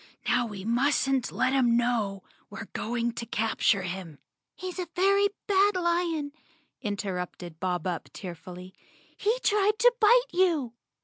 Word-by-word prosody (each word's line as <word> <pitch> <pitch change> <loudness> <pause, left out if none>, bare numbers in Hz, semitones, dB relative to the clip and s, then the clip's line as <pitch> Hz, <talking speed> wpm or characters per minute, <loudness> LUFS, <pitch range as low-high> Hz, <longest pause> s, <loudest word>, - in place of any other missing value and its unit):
Now 245 -1 +2
we 200 -3 -8
mustn't 265 +2 +1
let 260 0 +1
him 240 -3 +3
know 225 -5 0
k - - -29 0.2
we're 200 0 -7
going 235 +1 -1
to 235 - -5
capture 220 -2 +1
him." 180 -4 -6 0.4
"He's 370 0 -6
a 360 - -3
very 395 +2 +4 0.2
bad 400 0 +3
lion," 340 -4 0 0.5
interrupted 180 -6 -4
Bob 180 -2 -2
Up 180 -3 -2
tear¬ 180 -3 -7
fully. 180 +2 -11 0.4
"He 440 +4 +1
tried 420 0 +3
to 485 +1 +5
bite 475 +2 +4
you!" 335 -10 +2
245 Hz, 145 wpm, -28 LUFS, -, 0.5 s, to